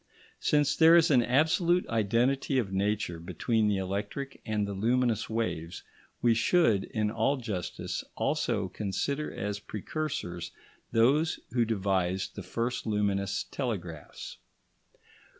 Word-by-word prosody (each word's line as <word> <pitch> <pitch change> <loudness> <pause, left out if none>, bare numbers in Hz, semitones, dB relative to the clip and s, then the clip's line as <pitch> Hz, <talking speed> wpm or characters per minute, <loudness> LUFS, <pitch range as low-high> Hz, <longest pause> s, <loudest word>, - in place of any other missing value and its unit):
Since 145 -1 +2
there 165 +2 +7
is 165 -2 +5
an 125 -3 +6
absolute 160 +8 +2
identity 120 +5 +1
of 100 -7 -1
nature 100 -3 -1
between 110 +6 0
the 105 -1 +2
electric 100 +9 -4
and 105 -2 0
the 100 - -4
luminous 120 +3 +1
waves, 90 -7 -3 0.4
we 120 -1 +5
should, 115 - +3
in 105 -1 -1
all 115 +6 +1
justice, 105 -8 -4
also - - 0
consider 140 +9 -2
as 105 +1 -3
precursors 105 - -4 0.4
those 140 +8 +3
who 120 -2 +2
devised 95 -4 0
the - - -7
first 120 +1 -3
luminous 100 -2 0
telegraphs. 90 - -5
110 Hz, 120 wpm, -29 LUFS, 100-135 Hz, 0.4 s, there